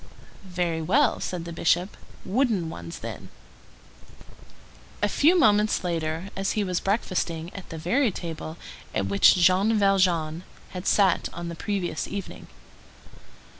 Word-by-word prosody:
"Very 175 -2 -1
well," 235 - +2
said 175 -2 -4
the 170 - -6
Bishop; 175 +3 +1 0.3
"wooden 205 -6 0
ones 85 -1 -8
then." - - -8 1.7
A - - +5
few 315 - +4
moments 210 - +3
later 165 +1 -2 0.2
he 210 - 0
was 180 -2 -1
breakfasting 180 -5 -2
at 195 - -9
the 165 - -7
very 235 - +1
table 165 -3 -6 0.4
at - - 0
which 100 +1 +5
Jean 185 +5 +3
Valjean 180 -5 +2 0.3
had 180 0 -6
sat 195 -4 +3
on 170 0 -5
the 170 - -6
previous 195 0 -3
evening. 200 -2 -7
180 Hz, 130 wpm, -25 LUFS, 165-205 Hz, 1.7 s, A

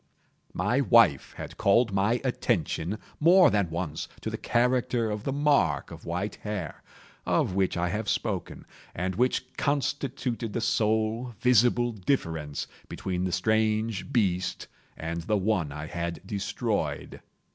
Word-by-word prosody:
My - - +1
wife - - +4
had - - -7
called 105 +2 +3
my 105 +5 +2
attention, 90 +7 -1 0.2
more 175 +3 +7
than 100 -4 +1
once, 80 -2 -4
to - - -3
the - - -3
character 120 -2 +1
of 105 0 -4
the 135 - 0
mark 140 - +2
of - - -10
white 90 +5 -3
hair, 100 -8 -5 0.4
of - - +1
which 95 -1 +1
I 85 0 0
have 105 +2 -2
spoken, - - -2 0.3
and 95 +2 -1
which 125 +4 0
constituted 135 -5 -1
the - - -1
sole 110 +2 0
visible 120 0 +4
difference 80 - -2 0.2
between 90 -1 -3
the 90 - -1
strange 110 +3 0
beast 95 -7 0 0.3
and 85 +1 -4
the 105 +6 0
one 95 -6 0
I 75 +2 -6
had 85 +2 -4
destroyed. 100 -1 -3
105 Hz, 135 wpm, -27 LUFS, 90-120 Hz, 0.4 s, more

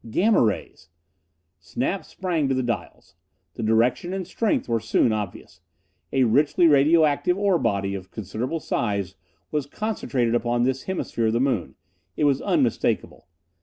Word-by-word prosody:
Gamma 210 - +3
rays! 100 -6 -2 0.7
Snap - - -3
sprang 170 -6 -2
to 135 - +1
the 130 - 0
dials. 115 -7 -5 0.4
The - - -7
direction 120 +10 +1
and 190 -1 -3
strength 210 +4 -1
were 115 -1 +1
soon 115 +1 +2
obvious. 105 -4 -6 0.5
A 135 - +3
richly 145 +9 +3
radio 155 +2 +5
active 150 +5 +1
ore 200 -4 +2
body, 100 -5 0
of 95 -1 -7
considerable 110 - -4
size, 100 - -2 0.4
was 150 -2 -1
concentrated 140 - -2
upon 120 0 +1
this 130 +1 -1
hemisphere 120 -11 -1
of 110 - +1
the 115 - +1
moon! 110 - -1 0.4
It - - 0
was 140 -2 +3
unmistakable. - - 0
125 Hz, 150 wpm, -24 LUFS, 110-155 Hz, 0.7 s, radio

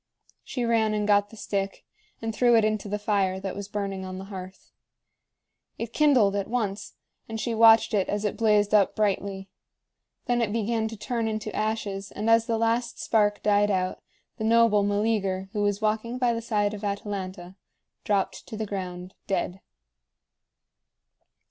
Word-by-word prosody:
She 245 -2 -3
ran 220 -2 +2
and 210 -1 -1
got 205 0 +3
the 225 - -14
stick 195 -2 -3 0.4
and 225 0 -2
threw 240 +1 +4
it 225 -2 +4
into 215 -1 -1
the 210 - -1
fire 200 -3 0
that 195 0 -5
was 200 0 -6
burning 200 -2 -4
on 185 0 -6
the 190 - -6
hearth. 185 0 -9 1.1
It 230 0 -5
kindled 255 -10 +4
at 200 -1 -1
once, 215 -4 -3 0.3
and 225 0 -4
she 235 +1 -2
watched 225 0 +6
it 195 -3 +1
as 205 +1 -1
it 210 - -1
blazed 210 -2 +2
up 205 -3 +4
brightly. 195 -2 -1 0.8
Then 240 -1 +1
it 220 -3 0
began 225 0 0
to 225 0 -7
turn 230 0 -2
into 215 -1 -4
ashes, 210 -2 -2
and 215 +2 -1
as 230 +1 +4
the 230 -1 +1
last 230 +1 0
spark 205 -2 +1
died 205 0 +3
out, 185 -2 -1 0.4
the - - -4
noble 225 -2 +4
Meleager, 200 -2 0
who 210 - -1
was 205 0 0
walking 220 +3 0
by 245 -2 +2
the 230 - -3
side 210 -3 0
of 210 0 -7
Atalanta, 195 -3 -4 0.5
dropped 200 -2 -1
to 220 - -7
the 220 - -2
ground 185 -2 -6
dead. 190 -1 -2
210 Hz, 170 wpm, -26 LUFS, 195-225 Hz, 1.1 s, watched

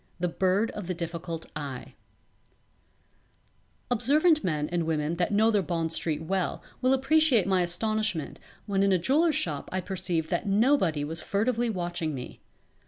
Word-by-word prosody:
_" - - -38 0.2
The 180 - +1
Bird 190 +5 +1
of 205 -4 -7
the 180 - -2
Difficult 170 -1 -5
Eye 140 -4 -6 2.0
Observant 305 +7 +3
men 150 -4 -1
and 170 -2 -1
women 160 +1 -1
that 175 +2 0
know 220 +2 +4
their 205 -2 +2
Bond 165 -2 -2
Street 160 -1 -2
well 185 +2 -2 0.2
will 255 0 +3
appreciate 270 -4 +3
my 190 -2 +2
astonishment 210 -1 -1 0.3
when 195 -2 0
in 200 0 +3
a 185 - +4
jewellers' 295 - +2
shop 150 -4 -2
I 185 - -1
perceived 175 -3 -2
that - - -1
nobody 200 - +2
was 160 +2 -4
furtively 235 +3 0
watching 175 -6 -2
me. 125 -1 -8
185 Hz, 160 wpm, -27 LUFS, 165-220 Hz, 2.0 s, know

